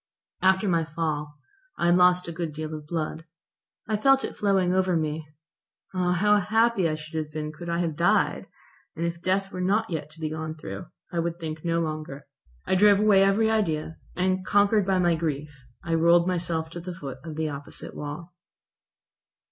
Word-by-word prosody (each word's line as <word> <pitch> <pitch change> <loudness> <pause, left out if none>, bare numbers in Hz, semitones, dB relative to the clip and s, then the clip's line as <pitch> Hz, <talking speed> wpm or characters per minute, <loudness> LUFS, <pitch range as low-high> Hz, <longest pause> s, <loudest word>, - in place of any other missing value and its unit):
After 190 +2 +3
my 170 -3 +2
fall 150 -2 -3 0.4
I - - 0
had 175 0 +5
lost 180 0 +4
a - - -4
good 165 -2 -4
deal 155 +1 -5
of 150 -1 -7
blood. 160 0 -3 0.6
I 215 - 0
felt 270 +4 +4
it - - -4
flowing 190 -3 +2
over 185 -1 +2
me. 155 0 -2 0.7
Ah! 180 -1 +1
how 210 +3 +4
happy 215 -2 +2
I 155 - -1
should 155 +1 -11
have 150 - -16
been 150 0 -4
could 170 +3 -8
I 170 +1 0
have 165 -3 -1
died, - - +2 0.5
and 165 - -2
if 170 0 -3
death 195 +2 0
were 185 - -4
not 205 +3 +1
yet 150 -2 -3
to 155 +1 -16
be 155 -1 -3
gone 155 0 -4
through. 100 -10 -7 0.2
I 170 - -1
would 170 0 -2
think 155 -2 -5
no 170 -1 +1
longer. 155 -3 -5 0.4
I - - 0
drove 200 +1 +6
away 205 -2 +5
every 215 +3 +3
idea, 160 -7 -1 0.2
and, 185 +1 0
conquered 205 +1 +3
by 190 -1 +3
my 175 -2 +3
grief, 155 -2 -3 0.3
I 170 - -2
rolled 170 +1 +4
myself 165 -3 -1
to 175 - -6
the 175 +1 -7
foot 135 -6 -7
of 160 -2 -7
the 155 0 -1
opposite 140 -1 -8
wall. 150 +4 -7
170 Hz, 195 wpm, -26 LUFS, 155-185 Hz, 0.7 s, drove